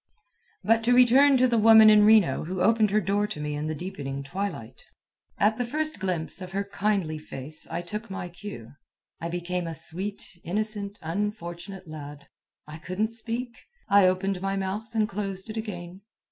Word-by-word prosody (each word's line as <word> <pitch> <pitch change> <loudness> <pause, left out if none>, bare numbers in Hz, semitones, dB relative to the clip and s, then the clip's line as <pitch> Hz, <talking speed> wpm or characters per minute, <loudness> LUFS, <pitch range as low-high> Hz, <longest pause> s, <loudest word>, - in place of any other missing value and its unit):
But 225 +1 +3
to 245 +1 +4
return 260 +3 +6
to 255 0 +4
the 235 -2 +2
woman 220 0 +8
in 210 -1 +6
Reno 215 -7 +4
who 185 +3 -4
opened 215 +3 +4
her 210 +2 +3
door 205 +2 0
to 210 - -6
me 150 0 -3
in 150 +1 -3
the 155 - -2
deepening 140 -5 -5
twilight. 140 - -5 0.5
At 215 +3 +2
the - - +2
first 310 +5 -2
glimpse 180 -1 -3
of 185 0 -8
her 200 +1 0
kindly 200 -5 -1
face 150 0 -9
I 175 - -3
took 210 +5 -6
my 190 -2 -5
cue. 175 - -9 0.5
I 170 - -4
became 175 0 -3
a 165 - -5
sweet, 185 +6 -5 0.2
innocent, 205 +2 -3
unfortunate 190 0 -4
lad. 145 -2 -9 0.4
I 155 +1 -9
couldn't 185 +7 -2
speak. 235 +1 -4 0.3
I 200 -2 +6
opened 185 0 0
my 195 0 -1
mouth 210 +4 -4
and 215 -1 +2
closed 195 -1 -5
it - - -8
again. 185 -4 -6
195 Hz, 175 wpm, -26 LUFS, 170-215 Hz, 0.5 s, woman